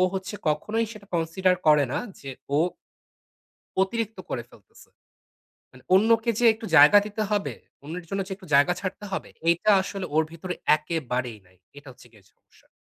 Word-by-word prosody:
হচ্ছে 190 +2 -4
কখনোই 215 +9 0
সেটা 205 -2 -13
consider 175 +3 +1
করে 150 -1 +6
না - - 0 0.2
যে 135 - -7 0.3
ও - - +3 1.2
অতিরিক্ত 220 +1 -2
করে 120 - -3
ফেলতেছে। 100 -4 -19 0.8
মানে 125 - -17
অন্যকে 225 +4 +4
যে 245 - +1
একটু 220 0 -9
জায়গা 150 +8 +9
দিতে 215 +1 -3
হবে। 205 -1 -1 0.3
অন্যের 170 +4 -7
জন্য 195 +2 -2
যে - - -5
একটু 190 - -15
জায়গা 145 +5 +5
ছাড়তে 200 +2 -5
হবে। - - -4 0.2
এইটা 170 +5 +3
আসলে 195 -1 -5
ওর 160 - +4
ভিতরে 180 +2 -5 0.2
একেবারেই 130 -7 -3
নাই। 95 +1 -25 0.2
এটা 145 0 -14
হচ্ছে 120 - -18
গিয়ে 105 -3 -21
সমস্যা। - - -28
180 Hz, 165 wpm, -25 LUFS, 145-205 Hz, 1.2 s, জায়গা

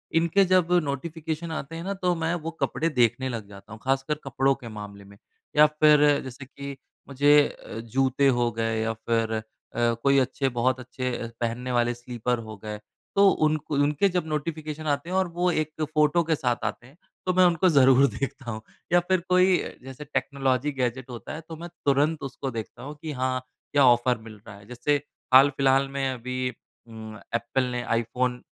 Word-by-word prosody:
इनके 170 +4 +4
जब 180 -2 +3
नोटिफ़िकेशन 160 +3 -4
आते 160 0 -5
हैं 165 - -5
ना 195 +2 -2
तो 180 -1 +2
मैं 165 0 -1
वो 165 +1 -4
कपड़े 165 - 0
देखने 120 +2 +2
लग 115 -4 -5
जाता 100 +1 -14
हूँ 110 - -10
ख़ासकर 135 +3 +1
कपड़ों 135 0 +1
के 125 -3 -11
मामले 105 -2 -9
में। 100 0 -16 0.4
या 150 - +9
फ़िर 150 -1 +4
जैसे 130 +1 -9
कि 140 +1 -8 0.3
मुझे 145 +2 +5
अ, 110 - -9
जूते 130 +4 +1
हो 120 -2 +2
गए 115 0 -1
या 115 0 -1
फ़िर 115 0 -1
अ, 110 - -1 0.4
कोई 120 +4 +3
अच्छे 135 +1 0
बहुत 130 +1 +2
अच्छे 125 0 -4 0.3
पहनने 120 +2 -2
वाले 120 0 +2
स्लिपर 120 0 -3
हो 110 - -8
गए। 105 -1 -5 0.4
तो 200 0 +6
उन 155 0 +2
क 155 +1 -16
उनके 145 +5 +2
जब 180 -2 -1
नोटिफ़िकेशन 155 0 -4
आते 145 +3 -1
हैं 185 - -2
और 190 -1 +2
वो 175 +1 +1
1 155 -1 -2
फ़ोटो 150 +2 +3
के 160 0 +1
साथ 125 -4 -1
आते 125 - -4
हैं 140 +5 -20 0.3
तो 185 - +1
मैं 185 +1 +5
उनको 175 +1 +3
ज़रूर 135 -2 +6
देखता 135 -2 -5
हूँ। 110 -1 -6 0.3
या 175 - +7
फ़िर 185 +1 +1
कोई 185 0 +5 0.3
जैसे 135 +2 -9
टेक्नोलॉज़ी 140 -1 0
गैजेट 130 -1 -2
होता 120 +3 -7
है 155 - -6
तो 165 - -6
मैं 170 +2 -8 0.2
तुरंत 145 +2 +2
उसको 135 0 -5
देखता 115 +1 -7
हूँ 145 +3 -7
कि 160 - -4
हाँ, 130 -1 -1 0.3
क्या 140 -2 +5
ऑफ़र 120 0 +4
मिल 110 -1 -12
रहा 105 - -9
है। 100 0 -17
जैसे 125 +5 0 0.4
हाल-फ़िलहाल 135 0 +5
में 135 0 -1
अभी 125 +1 -3 0.4
उम 110 -1 -9 0.2
एप्पल 120 +3 0
ने 120 0 -2
आईफ़ोन 120 +2 -1
135 Hz, 190 wpm, -26 LUFS, 120-155 Hz, 0.4 s, या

